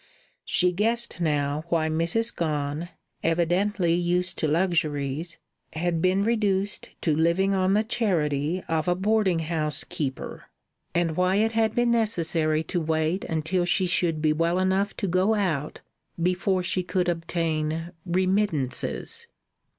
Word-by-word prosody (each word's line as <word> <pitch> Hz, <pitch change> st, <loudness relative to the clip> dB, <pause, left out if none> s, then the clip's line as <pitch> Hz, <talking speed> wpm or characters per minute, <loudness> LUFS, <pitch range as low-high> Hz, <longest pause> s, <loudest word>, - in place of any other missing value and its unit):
She 180 Hz, -1 st, +3 dB
guessed 225 Hz, +3 st, -1 dB
now 145 Hz, -1 st, 0 dB
why 165 Hz, -2 st, +1 dB
Mrs. 170 Hz, +9 st, 0 dB
Gone, 150 Hz, 0 st, -2 dB, 0.3 s
evidently 175 Hz, +2 st, +1 dB
used 180 Hz, +1 st, 0 dB
to 155 Hz, -, +1 dB
luxuries, 155 Hz, -2 st, 0 dB, 0.4 s
had 165 Hz, 0 st, -1 dB
been 185 Hz, +2 st, +2 dB
reduced 205 Hz, -3 st, 0 dB
to 155 Hz, -3 st, +1 dB
living 170 Hz, +5 st, +2 dB
on 190 Hz, 0 st, +2 dB
the 210 Hz, +2 st, +3 dB
charity 175 Hz, -7 st, 0 dB
of 160 Hz, +1 st, -1 dB
a 175 Hz, -, +3 dB
boarding 200 Hz, -1 st, +2 dB
house 155 Hz, -2 st, -1 dB
keeper, 135 Hz, -4 st, -5 dB, 0.5 s
and 170 Hz, -2 st, +1 dB
why 185 Hz, +2 st, +2 dB
it 220 Hz, +2 st, +2 dB
had 220 Hz, -1 st, +1 dB
been 240 Hz, 0 st, +2 dB
necessary 165 Hz, -8 st, +2 dB
to 175 Hz, +1 st, -2 dB
wait 160 Hz, +3 st, 0 dB
until 165 Hz, +3 st, 0 dB
she 180 Hz, +2 st, +2 dB
should 170 Hz, -3 st, +1 dB
be 155 Hz, -1 st, +3 dB
well 165 Hz, +3 st, +1 dB
enough 190 Hz, +2 st, 0 dB
to 200 Hz, -, -2 dB
go 185 Hz, +5 st, +2 dB
out 160 Hz, -8 st, -2 dB, 0.4 s
before 185 Hz, +2 st, +1 dB
she 185 Hz, +1 st, +1 dB
could 180 Hz, 0 st, -1 dB
obtain 165 Hz, -1 st, -1 dB
"remittances." 185 Hz, -, -1 dB
175 Hz, 135 wpm, -25 LUFS, 160-190 Hz, 0.5 s, She